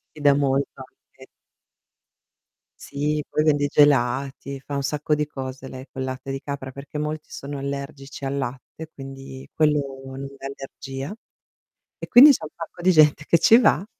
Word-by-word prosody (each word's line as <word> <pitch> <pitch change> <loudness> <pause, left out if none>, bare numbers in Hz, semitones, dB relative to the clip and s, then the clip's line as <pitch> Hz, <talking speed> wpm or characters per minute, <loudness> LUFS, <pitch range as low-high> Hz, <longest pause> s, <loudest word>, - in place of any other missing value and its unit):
Ti 155 - -10
da 145 -1 +6
molta 140 -1 0
anche. - - -20 1.5
Sì, 150 +2 -2
poi 150 - 0
vende 145 -2 +3
i - - +1
gelati, 140 -1 +2
fa 145 - -6
un 140 - -1
sacco 150 +2 -1
di 150 0 0
cose 130 -2 -7
lei 130 0 -9
col 130 - -4
latte 130 +1 -5
di 135 - -3
capra, 135 -1 -6
perché 140 +3 -8
molti 150 +1 -4
sono 140 +1 -7
allergici 140 0 -6
al 135 +1 -2
latte 135 +4 -6
quindi 135 -1 -9
quello 145 -3 +1
non 135 +1 -7
dà 135 - -10
allergia. 135 +2 -7 0.9
E - - -6
quindi 260 +5 +9
c'è 275 - -1
un 155 - -5
sacco 165 +1 -8
di 185 +1 +4
gente 150 -2 +5
che 170 - +5
ci 225 +8 +7
va 175 - +3
140 Hz, 170 wpm, -23 LUFS, 135-150 Hz, 1.5 s, quindi